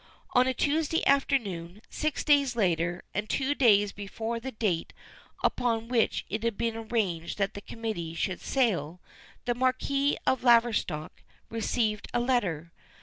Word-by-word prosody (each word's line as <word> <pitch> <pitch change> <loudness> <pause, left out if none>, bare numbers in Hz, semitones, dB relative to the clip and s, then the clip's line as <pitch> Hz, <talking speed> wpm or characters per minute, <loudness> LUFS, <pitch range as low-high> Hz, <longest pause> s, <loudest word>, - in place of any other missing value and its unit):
On 250 0 +4
a 260 - +1
Tuesday 315 +4 +1
afternoon, 210 -9 0
six 310 -1 -2
days 280 -4 +3
later, 175 -4 0
and 210 +2 -3
two 275 +1 +1
days 205 -7 +4
before 220 +4 -4
the 265 +3 -5
date 205 -8 -1 0.5
upon 230 -1 0
which 240 -3 +1
it 215 +2 -3
had 230 -2 -1
been 230 -1 -1
arranged 215 -7 -2
that 195 -1 0
the 205 - -7
committee 205 -8 -5
should 185 +1 -2
sail, 180 - 0 0.5
the 240 - +1
Marquis 260 +3 +1
of 260 - +2
Laverstock 230 -10 +2 0.3
received 220 -1 -1
a - - +3
letter. 195 - 0
225 Hz, 145 wpm, -28 LUFS, 195-255 Hz, 0.5 s, On